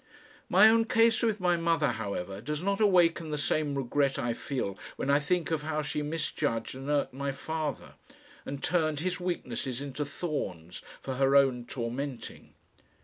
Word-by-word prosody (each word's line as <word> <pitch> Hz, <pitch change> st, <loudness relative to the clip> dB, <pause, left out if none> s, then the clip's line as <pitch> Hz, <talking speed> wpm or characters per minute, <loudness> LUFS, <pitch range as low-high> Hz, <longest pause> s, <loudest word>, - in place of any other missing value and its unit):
My 195 Hz, +4 st, +8 dB
own 225 Hz, +1 st, +5 dB
case 225 Hz, 0 st, +4 dB
with 220 Hz, -3 st, +1 dB
my 180 Hz, -1 st, +2 dB
mother, 165 Hz, -3 st, +2 dB
however, 100 Hz, -2 st, -4 dB
does 150 Hz, +6 st, -3 dB
not 200 Hz, +2 st, 0 dB
awaken 175 Hz, -5 st, +4 dB
the 150 Hz, -, -2 dB
same 145 Hz, 0 st, 0 dB
regret 140 Hz, +1 st, +1 dB
I 120 Hz, -1 st, -1 dB
feel 115 Hz, -7 st, -3 dB, 0.2 s
when 140 Hz, -, -1 dB
I 140 Hz, -, +5 dB
think 170 Hz, +2 st, 0 dB
of 160 Hz, -2 st, 0 dB
how 155 Hz, 0 st, -2 dB
she 150 Hz, 0 st, -2 dB
misjudged 150 Hz, -6 st, -2 dB
and 135 Hz, +2 st, -7 dB
irked 145 Hz, -3 st, +1 dB
my 140 Hz, +1 st, -2 dB
father, 150 Hz, +1 st, -4 dB, 0.5 s
and 140 Hz, 0 st, -6 dB
turned 155 Hz, -3 st, +1 dB
his 185 Hz, +1 st, -1 dB
weaknesses 130 Hz, -8 st, -3 dB
into 140 Hz, +1 st, -4 dB
thorns 95 Hz, -, -4 dB, 0.2 s
for 130 Hz, -1 st, -4 dB
her 135 Hz, +1 st, +3 dB
own 130 Hz, -3 st, +4 dB
tormenting. 125 Hz, +2 st, -5 dB
145 Hz, 165 wpm, -29 LUFS, 130-165 Hz, 0.5 s, My